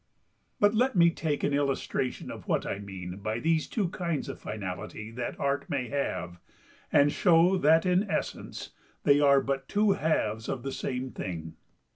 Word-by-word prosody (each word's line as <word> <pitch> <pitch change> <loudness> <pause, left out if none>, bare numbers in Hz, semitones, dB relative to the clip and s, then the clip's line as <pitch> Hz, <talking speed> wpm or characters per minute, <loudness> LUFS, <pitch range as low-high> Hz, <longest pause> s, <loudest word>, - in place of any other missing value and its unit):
But 205 0 +4
let 250 +2 +2
me 170 -1 +6
take 155 -3 -2
an 145 - +1
illustration 135 -2 -1
of - - -10
what - - +1
I 100 - -3
mean 95 -2 -7
by 110 +2 -3
these 160 +3 +1
two 200 -6 -1
kinds 170 -4 -2
of - - -6
finality 105 +1 -6
that 120 +1 -5
Art 140 +1 -1
may 130 -4 -2
have, 90 -11 -3 0.5
and 145 0 +5
show 175 +2 +4
that 160 +1 +5
in 185 +3 +2
essence - - -4 0.3
they 145 0 +5
are 140 -1 +5
but 135 0 -3
two 210 0 +3
halves 110 - 0
of 125 - -3
the 135 - -3
same 130 0 -3
thing. 80 -3 -5
140 Hz, 170 wpm, -28 LUFS, 110-165 Hz, 0.5 s, me